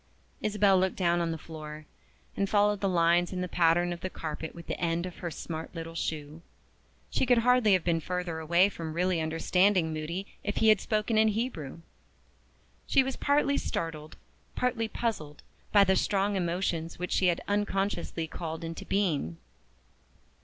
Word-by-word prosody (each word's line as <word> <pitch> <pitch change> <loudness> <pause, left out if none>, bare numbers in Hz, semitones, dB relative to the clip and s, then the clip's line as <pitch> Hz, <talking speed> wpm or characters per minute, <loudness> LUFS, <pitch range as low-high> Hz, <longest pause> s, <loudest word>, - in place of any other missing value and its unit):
Isabel 205 -2 +3
looked 190 0 +1
down 175 -2 +2
on 170 - 0
the 165 - -2
floor, 155 -1 -9 0.5
and 200 -1 0
followed 205 -1 +3
the 195 - +1
lines 175 0 +3
in 185 -1 -3
the 180 - -2
pattern 175 0 +2
of 170 - -9
the 185 - -3
carpet 160 -2 -6
with 170 -1 -10
the - - -4
end 170 0 0
of 180 - -8
her 175 - -4
smart 160 +1 -6
little 165 0 -6
shoe. 155 -1 -4 0.7
She 260 - +1
could 245 -1 +5
hardly 240 -2 +4
have 185 -3 +3
been 170 -2 +1
further 180 -1 -3
away 170 +4 +4
from 165 -5 -6
really 180 0 +1
understanding 165 +2 +2
Moody 165 +5 -4 0.2
if 205 - -3
he 220 - +4
had 215 -3 +5
spoken 215 0 +1
in 220 - +5
Hebrew. 205 - -3 1.1
She 270 - +4
was 265 0 -3
partly 285 0 +2
startled, 155 -1 -4 0.4
partly 245 -3 0
puzzled, 195 -11 -4 0.3
by 205 -1 +7
the 190 -1 +3
strong 200 +2 +1
emotions 170 -2 -1
which 180 0 -4
she 185 - +3
had 175 -1 +1
unconsciously 195 -4 -1
called 160 +1 -6
into 165 0 -6
being. 155 - 0
175 Hz, 170 wpm, -29 LUFS, 165-205 Hz, 1.1 s, by